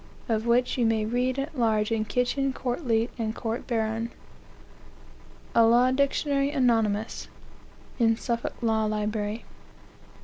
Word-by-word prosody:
of 225 Hz, 0 st, -1 dB
which 245 Hz, +2 st, +2 dB
you 240 Hz, -, +3 dB
may 220 Hz, -1 st, +1 dB
read 250 Hz, +3 st, 0 dB
at 285 Hz, +4 st, -4 dB
large 220 Hz, -3 st, +1 dB
in 225 Hz, -1 st, +1 dB
Kitchen's 250 Hz, +5 st, 0 dB
Court 250 Hz, +3 st, -3 dB
leet 225 Hz, +1 st, +1 dB
and 220 Hz, -1 st, -2 dB
Court 230 Hz, +1 st, -4 dB
baron." 225 Hz, -1 st, -1 dB, 1.4 s
A 230 Hz, -, +5 dB
Law 240 Hz, +3 st, +5 dB
Dictionary, 280 Hz, +1 st, +1 dB
anonymous, 225 Hz, -6 st, 0 dB, 0.7 s
(in 225 Hz, -1 st, +4 dB
Suffolk 235 Hz, -1 st, -3 dB
Law 220 Hz, -1 st, +2 dB
Library.) 210 Hz, +1 st, -2 dB
230 Hz, 130 wpm, -26 LUFS, 220-250 Hz, 1.4 s, A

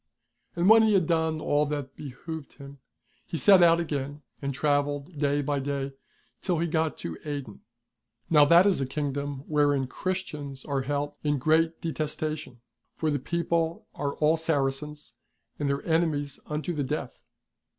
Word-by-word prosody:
And 175 Hz, +1 st, +2 dB
when 220 Hz, +1 st, +8 dB
he 220 Hz, -2 st, +4 dB
had 185 Hz, -4 st, +3 dB
done 160 Hz, -1 st, +1 dB
all 145 Hz, 0 st, +1 dB
that 145 Hz, -2 st, -4 dB
behoved 150 Hz, +3 st, -8 dB
him, 140 Hz, -1 st, -12 dB, 0.4 s
he 165 Hz, -, -5 dB
set 195 Hz, +1 st, +7 dB
out 170 Hz, -1 st, +6 dB
again 145 Hz, -2 st, -3 dB, 0.2 s
and 140 Hz, -1 st, -2 dB
travelled 145 Hz, +2 st, -1 dB
day 145 Hz, 0 st, +1 dB
by 145 Hz, 0 st, 0 dB
day 140 Hz, 0 st, -3 dB, 0.5 s
till 180 Hz, -3 st, 0 dB
he 165 Hz, -, +1 dB
got 160 Hz, -1 st, 0 dB
to 80 Hz, -, -6 dB
Aden. 140 Hz, -8 st, -6 dB, 0.7 s
Now 150 Hz, -3 st, +6 dB
that 170 Hz, +5 st, +7 dB
is 195 Hz, -8 st, +3 dB
a 135 Hz, -, -1 dB
Kingdom 140 Hz, 0 st, -3 dB
wherein 145 Hz, -3 st, +2 dB
Christians 150 Hz, -4 st, -4 dB
are 140 Hz, -2 st, -1 dB
held 145 Hz, +2 st, -2 dB
in 145 Hz, -1 st, +1 dB
great 160 Hz, +4 st, +2 dB
detestation, 155 Hz, -5 st, -4 dB, 0.3 s
for 155 Hz, -1 st, 0 dB
the 145 Hz, -, 0 dB
people 170 Hz, +2 st, -1 dB
are 140 Hz, -1 st, -3 dB
all 155 Hz, +2 st, +3 dB
Saracens, 150 Hz, -3 st, -2 dB, 0.5 s
and 145 Hz, -1 st, 0 dB
their 140 Hz, 0 st, -2 dB
enemies 160 Hz, -4 st, 0 dB
unto 155 Hz, +4 st, -3 dB
the 150 Hz, -3 st, -1 dB
death. 135 Hz, -2 st, -4 dB
150 Hz, 160 wpm, -27 LUFS, 140-160 Hz, 0.7 s, when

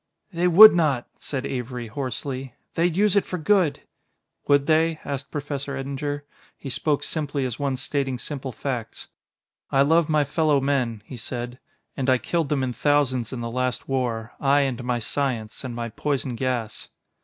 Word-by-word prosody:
"They 175 Hz, +1 st, +2 dB
would 210 Hz, +5 st, +10 dB
not," 150 Hz, -8 st, +1 dB
said 135 Hz, -2 st, -4 dB
Avery 125 Hz, -1 st, -4 dB
hoarsely; 130 Hz, +2 st, -4 dB, 0.2 s
"they'd 170 Hz, 0 st, +1 dB
use 210 Hz, -1 st, +4 dB
it 200 Hz, -, +4 dB
for 180 Hz, -, -4 dB
good." 180 Hz, -2 st, +2 dB, 0.7 s
"Would 140 Hz, -1 st, +4 dB
they?" 160 Hz, +1 st, +2 dB
asked 140 Hz, -1 st, -4 dB
Professor 140 Hz, -1 st, -4 dB
Eddinger. 140 Hz, +2 st, -3 dB, 0.3 s
He 135 Hz, -, -7 dB
spoke 145 Hz, +3 st, 0 dB
simply 145 Hz, -3 st, -1 dB
as 125 Hz, 0 st, -4 dB
one 140 Hz, -2 st, 0 dB
stating 135 Hz, -1 st, -2 dB
simple 135 Hz, 0 st, -5 dB
facts. 120 Hz, -2 st, -5 dB, 0.6 s
"I 135 Hz, 0 st, +4 dB
love 160 Hz, +2 st, +3 dB
my 155 Hz, -1 st, +3 dB
fellow 150 Hz, 0 st, +2 dB
men," 130 Hz, -6 st, 0 dB
he 130 Hz, -, -9 dB
said, 120 Hz, +1 st, -5 dB, 0.4 s
"and 135 Hz, -1 st, -1 dB
I 130 Hz, -, +5 dB
killed 165 Hz, +3 st, -1 dB
them 140 Hz, -3 st, +1 dB
in 125 Hz, -1 st, -1 dB
thousands 130 Hz, -3 st, +1 dB
in 125 Hz, -3 st, -5 dB
the 115 Hz, 0 st, -4 dB
last 125 Hz, +1 st, -2 dB
war 120 Hz, -4 st, -2 dB
I, 140 Hz, +1 st, +4 dB
and 130 Hz, -3 st, -1 dB
my 125 Hz, 0 st, 0 dB
science, 115 Hz, -1 st, -2 dB
and 125 Hz, -2 st, -5 dB
my 115 Hz, 0 st, -3 dB
poison 135 Hz, +2 st, -2 dB
gas." 120 Hz, -2 st, -3 dB
135 Hz, 170 wpm, -24 LUFS, 125-145 Hz, 0.7 s, would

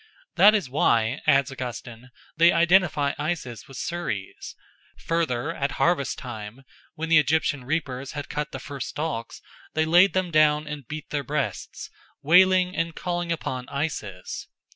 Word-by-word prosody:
That 210 Hz, +2 st, +7 dB
is 200 Hz, -9 st, 0 dB
why, 120 Hz, -2 st, +1 dB
adds 140 Hz, 0 st, +4 dB
Augustine, 125 Hz, -1 st, -7 dB, 0.3 s
they 170 Hz, +2 st, +6 dB
identify 170 Hz, -4 st, +3 dB
Isis 150 Hz, -8 st, -4 dB
with 135 Hz, -, -11 dB
Ceres. 145 Hz, -, -5 dB, 0.4 s
Further, 160 Hz, -3 st, -1 dB
at 140 Hz, -3 st, -2 dB
harvest 160 Hz, -6 st, +1 dB
time, 115 Hz, 0 st, -8 dB, 0.3 s
when 160 Hz, +1 st, -4 dB
the 165 Hz, -2 st, +7 dB
Egyptian 145 Hz, -2 st, 0 dB
reapers 135 Hz, -3 st, -3 dB
had 145 Hz, -1 st, -5 dB
cut 150 Hz, 0 st, -4 dB
the -, -, -5 dB
first 135 Hz, -1 st, -6 dB
stalks, 145 Hz, -7 st, -5 dB, 0.3 s
they 155 Hz, 0 st, +2 dB
laid 175 Hz, +4 st, +5 dB
them 185 Hz, -2 st, 0 dB
down 155 Hz, -1 st, +4 dB
and 150 Hz, -4 st, -7 dB
beat 155 Hz, -1 st, -7 dB
their 145 Hz, -1 st, -1 dB
breasts, 140 Hz, +1 st, -4 dB, 0.3 s
wailing 185 Hz, +3 st, +5 dB
and 165 Hz, -2 st, -2 dB
calling 175 Hz, -1 st, -3 dB
upon 130 Hz, -6 st, -4 dB
Isis. 110 Hz, -, -4 dB
150 Hz, 145 wpm, -25 LUFS, 130-165 Hz, 0.4 s, That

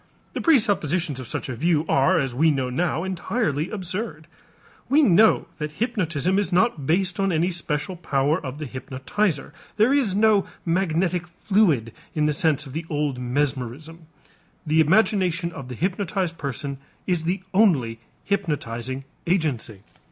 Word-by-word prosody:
The -, -, -3 dB
presuppositions 185 Hz, -, +2 dB
of 130 Hz, -, -7 dB
such -, -, -3 dB
a 130 Hz, -, -4 dB
view 160 Hz, +3 st, +1 dB
are, 165 Hz, +7 st, +3 dB
as 135 Hz, -4 st, -1 dB
we 155 Hz, +6 st, +3 dB
know 130 Hz, -4 st, 0 dB
now, 165 Hz, +4 st, 0 dB
entirely 185 Hz, -, -1 dB
absurd. 185 Hz, -4 st, -4 dB, 0.6 s
We 300 Hz, +3 st, +5 dB
know 215 Hz, -1 st, +5 dB
that 150 Hz, 0 st, -4 dB
hypnotism 185 Hz, -, 0 dB
is 205 Hz, -, 0 dB
not 175 Hz, -, +2 dB
based 180 Hz, +3 st, +1 dB
on 195 Hz, -1 st, +2 dB
any 170 Hz, +2 st, +1 dB
special 170 Hz, +1 st, -3 dB
power 150 Hz, -1 st, 0 dB
of 130 Hz, 0 st, -5 dB
the 155 Hz, -, -5 dB
hypnotizer; 140 Hz, -, -2 dB, 0.2 s
there 225 Hz, +5 st, +4 dB
is 250 Hz, -10 st, +2 dB
no 210 Hz, -1 st, +4 dB, 0.2 s
magnetic 175 Hz, 0 st, 0 dB
fluid 170 Hz, -, +1 dB, 0.2 s
in 150 Hz, -1 st, +2 dB
the 150 Hz, -, +2 dB
sense 145 Hz, -1 st, +1 dB
of 135 Hz, -, -10 dB
the 160 Hz, +2 st, -4 dB
old 145 Hz, -4 st, -1 dB
mesmerism. 140 Hz, +5 st, -3 dB, 0.6 s
The 155 Hz, +1 st, +4 dB
imagination 180 Hz, 0 st, +2 dB
of 140 Hz, -6 st, -8 dB
the 125 Hz, -, -6 dB
hypnotized 185 Hz, -, -1 dB
person 140 Hz, -2 st, -4 dB, 0.3 s
is 175 Hz, -3 st, 0 dB
the 185 Hz, +3 st, -1 dB
only 145 Hz, -, +3 dB, 0.2 s
hypnotizing 135 Hz, -, -2 dB, 0.2 s
agency. 145 Hz, -, -1 dB
165 Hz, 150 wpm, -24 LUFS, 140-190 Hz, 0.6 s, We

